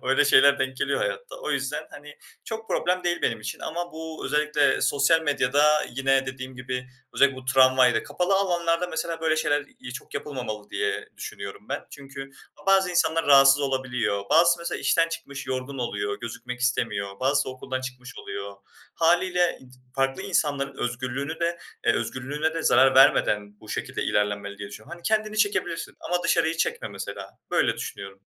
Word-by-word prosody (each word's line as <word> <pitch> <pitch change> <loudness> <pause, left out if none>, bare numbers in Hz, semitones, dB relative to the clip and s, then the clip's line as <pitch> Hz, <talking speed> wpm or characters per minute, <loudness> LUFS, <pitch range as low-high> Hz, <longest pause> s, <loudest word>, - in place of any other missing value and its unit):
Öyle 135 +3 +3
şeyler 140 0 +6
denk 130 0 -2
geliyor - - 0
hayatta. - - -3
O - - -4
yüzden, - - -2
hani, - - -11 0.3
çok 225 -1 -6
problem 180 +1 0
değil 175 0 0
benim - - 0
için 110 +1 -5
ama 175 +2 -4
bu 160 0 -7
özellikle 150 0 +2
sosyal 145 +3 +3
medyada 145 -1 +2 0.3
yine 135 +1 +1
dediğim 130 0 -7
gibi 125 0 -4 0.3
özellikle 140 -1 +4
bu 130 - -10
tramvayla, 130 -2 +4
kapalı 180 - 0
alanlarda 175 -3 +1
mesela 165 0 -3
böyle 160 -1 +1
şeyler, 145 -2 +1
iii, 125 - -8
çok - - -14
yapılmamalı 125 -8 -5
diye 425 -1 -2
düşünüyorum - - -8
ben. - - -3
Çünkü 135 -1 -9 0.4
bazı 195 -1 +4
insanlar 165 -2 +1
rahatsız 135 0 +7
olabiliyor. 125 -7 -1
Bazısı 170 +3 +5
mesela 170 0 -4
işten 165 0 +3
çıkmış 140 -4 -7
yorgun 130 +1 -4
oluyor, 100 -4 -2
gözükmek 125 +1 -6
istemiyor. 100 -5 -1
Bazısı 140 +2 +2
okuldan 130 0 -5
çıkmış 130 0 -8
oluyor. 100 0 -6 0.4
Hâliyle, 175 +1 +2
iii, 130 - -16 0.3
farklı 135 +5 0
insanların 145 -8 -1
özgürlüğünü 130 +6 -3
de 170 0 0 0.3
eee, - - +6
özgürlüğüne 145 +5 -2
de 165 - -2
zarar 130 +2 +5
vermeden 105 -5 +4
bu 110 - -15
şekilde - - -3
ilerlenmeli 100 -1 -1
diye 100 - -6
düşünüyorum. 110 +8 -11
Hani, 170 - -17
kendini 215 +1 0
çekebilirsin 205 -5 0
ama 175 0 -1
dışarıyı 160 +1 +2
çekme 480 - -1
mesela. - - -7 0.2
Böyle - - +2
düşünüyorum. 450 0 -7
140 Hz, 165 wpm, -25 LUFS, 130-170 Hz, 0.4 s, rahatsız